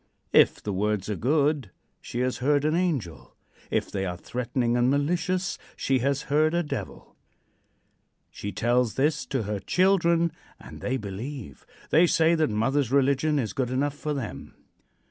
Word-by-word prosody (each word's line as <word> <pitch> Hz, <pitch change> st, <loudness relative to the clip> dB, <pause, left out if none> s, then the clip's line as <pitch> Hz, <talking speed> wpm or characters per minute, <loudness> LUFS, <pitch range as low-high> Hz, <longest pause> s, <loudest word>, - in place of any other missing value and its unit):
If -, -, +5 dB
the 105 Hz, -, -2 dB
words 105 Hz, 0 st, -1 dB
are -, -, -1 dB
good, 145 Hz, 0 st, +1 dB, 0.3 s
she 120 Hz, -, -4 dB
has 125 Hz, 0 st, 0 dB
heard 145 Hz, +2 st, +2 dB
an 155 Hz, -, +2 dB
angel; 160 Hz, -, -2 dB, 0.3 s
if -, -, -1 dB
they 95 Hz, -, -2 dB
are 90 Hz, -2 st, -3 dB
threatening 120 Hz, +3 st, -1 dB
and 120 Hz, +1 st, +3 dB
malicious, 175 Hz, +6 st, 0 dB, 0.2 s
she 135 Hz, -1 st, +1 dB
has 140 Hz, +2 st, 0 dB
heard 155 Hz, +3 st, +2 dB
a 175 Hz, -, +1 dB
devil. 150 Hz, -, -6 dB, 1.2 s
She 100 Hz, -, -6 dB
tells 120 Hz, +3 st, +1 dB
this 150 Hz, +2 st, +1 dB
to 135 Hz, -4 st, -1 dB
her 105 Hz, 0 st, -3 dB
children 170 Hz, -, +2 dB, 0.3 s
and -, -, -11 dB
they 130 Hz, +1 st, -1 dB
believe. 110 Hz, -, -7 dB, 0.2 s
They 170 Hz, +3 st, +6 dB
say 165 Hz, 0 st, +3 dB
that 160 Hz, -4 st, +2 dB
mother's 125 Hz, +4 st, 0 dB
religion 140 Hz, +2 st, +2 dB
is 120 Hz, -6 st, -1 dB
good 130 Hz, -3 st, -1 dB
enough 135 Hz, +3 st, 0 dB
for 150 Hz, 0 st, -3 dB
them. 130 Hz, -6 st, -6 dB
135 Hz, 160 wpm, -26 LUFS, 115-155 Hz, 1.2 s, They